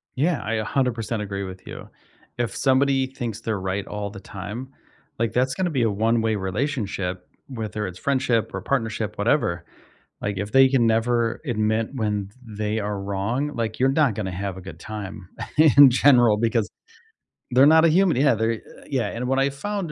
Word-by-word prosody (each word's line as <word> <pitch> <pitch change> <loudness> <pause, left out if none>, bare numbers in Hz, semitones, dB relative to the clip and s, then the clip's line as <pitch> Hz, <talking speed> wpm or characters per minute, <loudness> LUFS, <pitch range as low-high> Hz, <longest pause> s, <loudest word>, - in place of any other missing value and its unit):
Yeah, 155 +4 +1
I 110 +2 -2
100% 115 -1 -1
agree 100 -1 -4
with 95 -1 -9
you. - - -9 0.5
If 120 -4 -2
somebody 135 0 +2
thinks 120 -5 -6
they're 110 -3 -2
right 95 +1 -3
all 105 -1 -4
the 100 - -10
time, 105 +7 -7 0.5
like, 115 -1 0
that's 130 +1 +1
gonna 185 -1 -1
be 135 -7 0
a 115 - +3
one-way 110 +1 +1
relationship, 95 -3 -3 0.2
whether 110 -5 -4
it's 90 0 -9
friendship 125 -7 0
or 95 - -4
partnership, 110 -3 -2
whatever, 105 - +1 0.6
like, 100 -1 -3
if 100 +2 -4
they 135 0 +7
can 130 -3 +3
never 115 +1 +1
admit 110 -1 0
when 105 -5 -2
th 110 -2 -14
they 105 +1 -1
are 105 -1 -3
wrong, 100 +9 -2
like, 110 -2 -3
you're 130 - +4
not 140 -5 +2
gonna 95 -3 -4
have 95 0 -4
a - - -8
good 90 -3 -10
time 100 -3 -7 0.3
in 145 -3 +8
general 120 -4 +5
because 115 -1 0 0.8
they're 130 +3 +6
not 160 +2 +6
a - - +5
human, 180 -2 +3
yeah, 135 -2 +4
they're 110 +1 +1
eh, 115 - -5 0.3
yeah, 130 -7 -1
and 125 +2 -4
what 135 +1 +1
I 135 +1 +3
found 175 +5 -4
115 Hz, 185 wpm, -23 LUFS, 105-130 Hz, 0.8 s, in